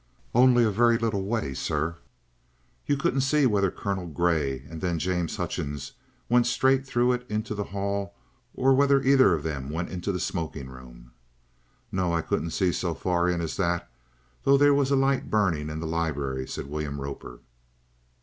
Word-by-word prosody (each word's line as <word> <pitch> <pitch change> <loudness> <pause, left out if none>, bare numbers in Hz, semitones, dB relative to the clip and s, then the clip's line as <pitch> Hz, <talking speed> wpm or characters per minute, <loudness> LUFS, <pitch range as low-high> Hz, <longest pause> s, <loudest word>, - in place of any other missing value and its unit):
"Only 125 0 +5
a 110 - +2
very 115 +3 +4
little 110 -4 -1
way, 105 -10 -2
sir." 80 +4 -2 0.9
"You 145 - +2
couldn't 135 -1 +1
see 140 +2 +3
whether 100 -5 +2
Colonel 95 -1 -4
Grey 75 -5 0
and 80 +1 -8
then 90 -2 0
James 90 0 -1
Hutchings 70 -1 -4 0.4
went 120 0 +3
straight 130 +2 +2
through 120 -1 +2
it 125 0 -1
into 105 +1 -2
the 105 -1 -3
hall, 100 0 -3 0.4
or 135 +1 +4
whether 140 0 +4
either 130 -9 +5
of 75 - -5
them 70 -4 -4
went 80 +3 -3
into 90 +2 -3
the 90 - -3
smoking 80 -7 -4
room?" - - -13 0.8
"No; 90 -2 0
I 85 -1 0
couldn't 85 - -1
see 90 +2 +1
so 85 0 -2
far 90 0 0
in 90 -1 0
as 80 - -4
that, 85 -7 -1 0.5
though 140 0 +4
there 145 +1 +5
was 140 -1 +2
a 140 - +3
light 135 0 +1
burning 85 -8 +1
in 75 +1 -5
the 80 - -4
libery," 75 -5 -2
said - - -5
William 70 0 -4
Roper. 70 -3 -7
90 Hz, 180 wpm, -26 LUFS, 80-120 Hz, 0.9 s, Only